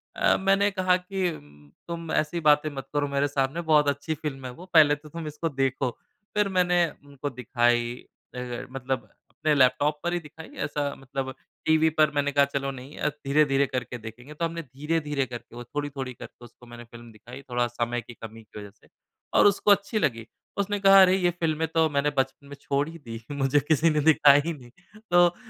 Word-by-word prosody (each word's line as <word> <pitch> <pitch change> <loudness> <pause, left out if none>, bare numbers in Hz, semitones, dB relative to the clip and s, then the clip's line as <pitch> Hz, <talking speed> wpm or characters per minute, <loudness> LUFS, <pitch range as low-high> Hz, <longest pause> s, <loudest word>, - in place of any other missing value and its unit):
अ, - - +3
मैंने 195 +1 +3
कहा 185 -1 +2
कि 185 0 -2
उम, 75 - -14 0.2
"तुम 170 -1 -5
ऐसी 155 +3 0
बातें 150 +1 +4
मत 135 - -6
करो 145 -1 +1
मेरे 140 0 0
सामने, 140 +3 -1
बहुत 155 -3 +3
अच्छी 145 +3 -2
फ़िल्म 135 -3 -6
है 125 - -5
वो, 170 +9 -12
पहले 150 -3 +7
तो 150 +1 -15
तुम 165 +1 -6
इसको 150 +2 -3
देखो।" 135 -2 0 0.5
फिर 210 -1 +2
मैंने 180 -1 +4 0.2
उनको 145 0 -6
दिखाई, 120 -1 +1 0.5
ए - - -4 0.2
ए - - -6
मतलब 130 -3 -3 0.2
अपने 155 -1 0
लैपटॉप 140 +3 +3
पर 175 0 -1
ही 175 - 0
दिखाई, 160 0 -12 0.2
ऐसा 145 -1 -2
मतलब 135 0 -5 0.3
टीवी 160 0 +4
पर 155 -2 +5
मैंने 145 0 +1
कहा, 140 0 +4
"चलो 140 0 -3
नहीं 135 +2 -11
अ, - - 0
धीरे-धीरे 140 -1 +2
करके 125 -1 -4
देखेंगे।" 120 +5 -10
तो 165 +3 -2
हमने 165 0 -4
धीरे-धीरे 150 0 -2
करके, 120 -2 -10
वो 120 - -7
थोड़ी-थोड़ी 135 0 -5
करके 120 0 -12
उसको 120 +1 -17
मैंने 120 0 -11
फ़िल्म 120 0 -13
दिखाई, 120 +5 -12
थोड़ा 120 0 +1
समय 120 0 -2
की 120 +1 -12
कमी 115 0 -11
की 105 - -12
वजह 105 -1 -9
से - - -23 0.5
और - - +5
उसको 205 +1 +3
अच्छी 200 +2 +2
लगी। 115 - -1 0.3
उसने 200 +1 -1
कहा, 195 0 +8
"अरे, 185 0 +6
ये 180 -2 +2
फ़िल्में 160 -1 0
तो 160 0 +2
मैंने 145 0 +1
बचपन 135 +1 -1
में 145 - -9
छोड़ 140 +1 0
ही 165 - -10
दी, 115 -5 -8
मुझे 140 0 +2
किसी 155 +1 +4
ने 150 -1 +1
दिखाया 145 -2 +6
ही 170 - -1
नहीं।" 125 -5 -14 0.4
तो, 175 0 +5
145 Hz, 205 wpm, -26 LUFS, 125-160 Hz, 0.5 s, कहा